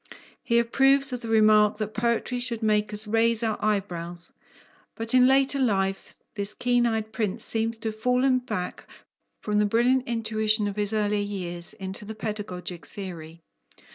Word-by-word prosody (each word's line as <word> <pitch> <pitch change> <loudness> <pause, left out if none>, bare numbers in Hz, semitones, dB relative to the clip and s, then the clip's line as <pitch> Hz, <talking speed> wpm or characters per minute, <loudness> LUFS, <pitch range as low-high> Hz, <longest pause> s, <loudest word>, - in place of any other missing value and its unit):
He 235 - +1
approves 270 +3 +4
of 250 - -4
the 230 - -6
remark 215 -1 +4
that 215 0 -4
poetry 235 +2 -1
should 240 -2 -1
make 210 -1 +1
us 210 +1 +2
"raise 225 +1 +2
our 220 -2 -2
eyebrows," 175 -5 -2 0.6
but 225 +1 -4
in 255 0 +6
later 270 +1 +3
life 195 -6 -1
this 205 0 -1
keen 245 -1 +2
eyed 220 -1 -2
prince 210 -5 -2
seems 225 0 -1
to 225 0 -3
have 215 0 -9
fallen 250 +2 +2
back 215 -7 -5 0.6
from 210 -1 0
the 210 - +3
brilliant 245 +4 +2
intuition 220 -2 +1
of 200 - -4
his 205 0 -2
earlier 210 -1 0
years 175 -4 -4
into 190 -1 -7
the 220 +1 -7
pedagogic 185 -5 -6
theory. 170 -4 -9
215 Hz, 165 wpm, -25 LUFS, 205-235 Hz, 0.6 s, in